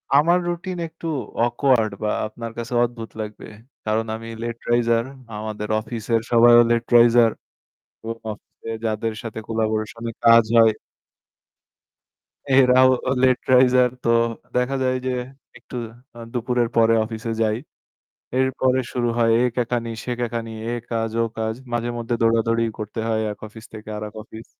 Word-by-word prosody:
আমার 165 +5 +5
routine 175 +1 -4
একটু 165 +1 -9 0.4
awkward 120 -2 +2
বা 105 - +1 0.2
আপনার 115 +1 -7
কাছে 115 +1 -5
অদ্ভুত 115 -2 -4
লাগবে। 105 0 -7 0.4
কারণ 110 +1 0
আমি 115 +1 -8
late 115 0 -5
riser 115 -1 +3 0.3
আমাদের 105 0 -5
অফিসের 115 0 -2
সবাইও 120 0 +7
late 115 0 +1
riser 120 0 +6 0.7
এবং 115 +1 -5 0.2
অফিসে 105 +2 -11 0.2
যাদের 110 +1 -1
সাথে 115 -1 -6
collaboration-এ 110 +1 -2
কাজ 115 0 +7
হয় 115 -1 +7 1.8
এরাও 130 -1 +6 0.3
late 130 -1 +3
riser 125 0 +5
তো - - 0 0.5
দেখা 125 +2 +1
যায় 130 0 +1
যে 130 - 0 0.5
একটু 125 +1 -12 0.4
আ - - -9
দুপুরের 120 -1 0
পরে 115 0 +5
অফিসে 115 0 -5
যাই। 110 -1 +1 0.8
এরপরে 130 0 +2
শুরু 120 -1 0
হয় 115 -1 +3
এ - - +3
কেকানি, 120 -1 -1
সে 125 - -4
কেকানি, 115 -1 -3 0.2
এ - - -2 0.2
কাজ, 115 -1 -1
ও - - +3
কাজ। 110 0 -2 0.2
মাঝেমধ্যে 120 0 -2
দৌড়াদৌড়ি 115 0 +2 0.2
করতে 105 +2 -5
হয় 110 -1 0
এক 105 - -9
অফিস 110 +1 -13
থেকে 110 -1 -9
আরেক 105 0 -6
অফিস। 110 0 -11
115 Hz, 140 wpm, -22 LUFS, 110-125 Hz, 1.8 s, সবাইও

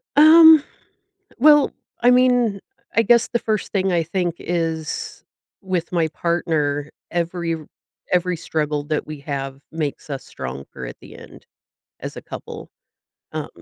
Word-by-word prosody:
Um, 315 0 +9 0.7
well, 295 +2 +6 0.3
I 245 +1 +6
mean, 245 -5 +3 0.4
I 230 - +5
guess 235 +1 +4
the 235 - 0
first 215 -2 -2
thing 190 -1 +1
I 170 -2 +2
think 175 0 -2
is 165 -2 -3 0.4
with 185 -3 -3
my 170 -3 +1
partner, 150 -4 -1 0.2
every 170 -1 -1
r 155 -2 -10 0.5
every 180 -1 +1
struggle 150 -2 -2
that 155 0 -3
we 155 -2 -7
have 135 -2 -5
makes 155 -2 -4
us 135 - -5
stronger 65 0 -8
at - - -8
the - - -13
end - - -14 0.6
as - - -7
a - - -7
couple. - - -9 0.6
Um, - - -4
170 Hz, 140 wpm, -21 LUFS, 150-215 Hz, 0.7 s, Um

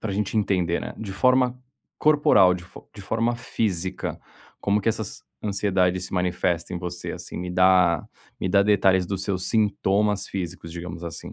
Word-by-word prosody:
para 105 -3 -3
gente 105 +2 -2
entender, 90 -5 +1
né, - - -6
de 100 -3 -5
forma 125 +3 +3 0.4
corporal 145 -11 +5
de 90 -1 -7
fo - - -15
de 105 - -10
forma 115 +4 0
física, 95 -6 -3 0.4
como 100 +1 +1
que 105 - 0
essas 110 -2 -3 0.2
ansiedade 95 -3 +1
se 90 - -7
manifesta 90 -1 -1
em - - -3
você, 90 0 -5
assim, - - -8
me 90 0 -4
dá 90 -2 +4 0.4
me 95 - -1
dá 100 +1 +4
detalhes 95 -3 +3
dos 95 0 -3
seus 95 -2 -2
sintomas 105 -2 +1
físicos 90 -3 -5
digamos 85 0 -7
assim. 85 - -7
95 Hz, 170 wpm, -24 LUFS, 90-105 Hz, 0.4 s, corporal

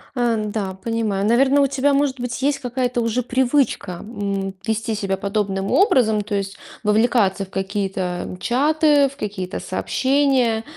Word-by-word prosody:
Ан 225 -4 0
да, 195 -3 -3
понимаю. 220 -4 -1
Наверно, 265 +5 +4
у 275 - +4
тебя, 280 +1 +1
может 275 -2 +1
быть, 245 +1 -4
есть 275 0 +1
какая-то 250 -1 -1
уже 230 +2 0
привычка, 250 -5 +1
м, 200 -3 -4
вести 220 0 -1
себя 195 -2 -1
подобным 200 -1 -2
образом, 240 - +3
то 205 +1 -6
есть 195 0 -3 0.3
вовлекаться 210 -2 +2
в - - -22
какие-то 190 -2 -3
чаты, 295 - +3
в 275 - -16
какие-то 195 -5 -4
сообщения. 260 -5 +1
230 Hz, 145 wpm, -21 LUFS, 200-265 Hz, 0.3 s, Наверно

